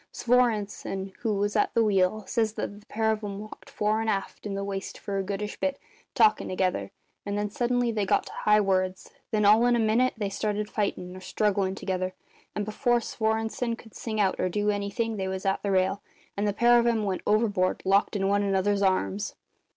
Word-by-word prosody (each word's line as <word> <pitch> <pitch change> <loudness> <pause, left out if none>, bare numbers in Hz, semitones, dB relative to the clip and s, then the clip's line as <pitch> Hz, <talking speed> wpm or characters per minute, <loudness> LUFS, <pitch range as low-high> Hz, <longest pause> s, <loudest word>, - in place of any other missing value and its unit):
Svorenssen, 210 -5 0
who 225 -4 0
was 205 +1 -1
at - - +1
the 230 - +4
wheel, 200 0 +2
says 220 +1 0
that 205 -1 -5
the 210 - -22
pair 220 0 +1
of 215 0 -3
'em 200 -1 -4
walked 215 +1 -10
fore 215 +1 0
and 225 - -1
aft 195 +1 -3
in 200 - -3
the 200 - -2
waist 195 -1 -5
for 200 -1 -3
a - - -1
goodish 205 +2 -4
bit, 280 -1 0 0.4
talkin' 220 -3 +4
together; 185 0 -1 0.3
and 200 0 -3
then 205 0 -2
suddenly 245 +1 +1
they 215 -2 -1
got 190 - +2
to - - -9
high 210 0 +3
words; 185 -1 0 0.2
then, 210 -1 +1
all 215 +3 +6
in 245 - +4
a - - +1
minute, 225 +3 +2
they 210 -2 -1
started 210 +1 -2
fightin' 185 -3 -2
or - - -8
strugglin' 195 -1 0
together, 185 -1 -3 0.4
and 210 -1 -1
before 240 +3 +1
Svorenssen 225 +1 -1
could 225 -3 -15
sing 220 -2 -4
out 195 -2 +2
or 185 - +1
do 210 +3 +1
anything 210 +2 -2
they 190 -1 -2
was 190 0 -4
at 195 0 +1
the 200 - -2
rail, 190 +1 +1 0.3
and 205 +1 0
the 205 - +1
pair 240 +3 +5
of 235 - +2
'em 225 -2 +2
went 195 -3 -2
overboard, 210 -4 +1
locked 195 +3 +3
in 195 -1 +1
one 200 +1 +2
another's 200 0 +1
arms." 195 +1 0
205 Hz, 215 wpm, -27 LUFS, 195-220 Hz, 0.4 s, all